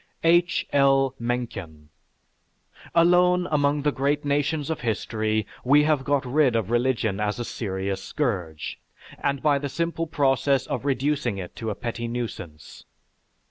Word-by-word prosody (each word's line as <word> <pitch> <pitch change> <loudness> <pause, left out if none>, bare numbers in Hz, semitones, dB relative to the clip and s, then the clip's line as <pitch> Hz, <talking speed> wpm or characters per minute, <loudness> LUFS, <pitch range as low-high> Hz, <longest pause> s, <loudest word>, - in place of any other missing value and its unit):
H. 175 +1 +3
L. 135 -1 +4
MENCKEN 100 -11 -4 1.1
Alone 180 +1 +4
among 145 -1 +2
the 150 - +2
great 145 +2 0
nations 145 +1 0
of 160 - -3
history 110 -1 -1 0.2
we 145 +3 +5
have 150 -3 +2
got 140 -1 0
rid 130 -1 +2
of 115 -1 -1
religion 120 -4 +1
as 105 +1 -1
a 120 - -3
serious 95 -3 -3
scourge, 90 - -3 0.4
and 140 -1 0
by 145 -2 +3
the 140 0 -4
simple 165 +2 -2
process 135 -2 +2
of - - -4
reducing 135 -4 0
it 90 -2 -7
to 115 - -3
a 105 - -3
petty 115 +1 -4
nuisance. 100 -10 -6
135 Hz, 140 wpm, -25 LUFS, 110-145 Hz, 1.1 s, we